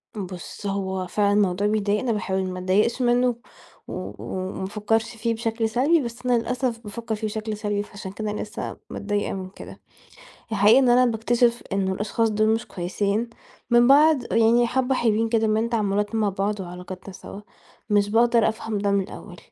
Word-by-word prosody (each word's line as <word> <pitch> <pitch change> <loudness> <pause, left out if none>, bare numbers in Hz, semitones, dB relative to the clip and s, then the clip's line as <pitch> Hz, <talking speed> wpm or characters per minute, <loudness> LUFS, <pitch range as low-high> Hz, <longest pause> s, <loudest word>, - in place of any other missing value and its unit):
بُص، 185 0 -7
هو 190 -2 -2
فعلًا 205 +2 +1
الموضوع 200 0 +2
بيضايقني، 210 +2 0
باحاول 190 -3 -1
ما 185 0 -4
اتضايقش 205 +7 +1
منه 245 0 +3 0.5
و - - -5
وما 190 0 -4
افكرش 220 +3 -1
فيه 230 +1 -1
بشكل 225 0 -1
سلبي، 285 +8 +3
بس 240 +1 -7
أنا 245 -1 +3
للأسف 245 0 -2
بافَكَر 225 0 -5
فيه 215 0 -3
بشكل 215 0 -4
سلبي، 205 -1 -1
فعشان 195 -2 -9
كده 215 +1 -4
أنا 210 - -4
لسه 215 +2 -6
متضايقة 205 0 -2
من 185 -1 -5
كده. - - -12 0.7
الحقيقة 215 +4 +6
إن 255 -2 +3
أنا 250 +1 +5
باكتشف 235 +1 +1
إنه 190 -1 0
الأشخاص 220 +3 0
دول 215 +1 +1
مش 225 +1 0
كويسين، 200 +5 -2 0.4
من 240 +1 +5
بعد 285 -2 +5
يعني 230 +1 +4
حَبّة 260 +1 +1
حلويين 225 -1 +1
كده 225 -1 +2
من 220 +2 +1
تعاملات 210 -1 0
مع 215 -2 +2
بعض، 200 +2 -2
وعلاقاتنا 180 +1 -8
سوا، 200 +2 -10 0.5
مش 205 -1 +3
باقدر 235 0 +4
أفهم 220 -1 -4
ده 200 0 0
من 200 -1 +3
الأول. - - -10
215 Hz, 170 wpm, -24 LUFS, 200-235 Hz, 0.7 s, الحقيقة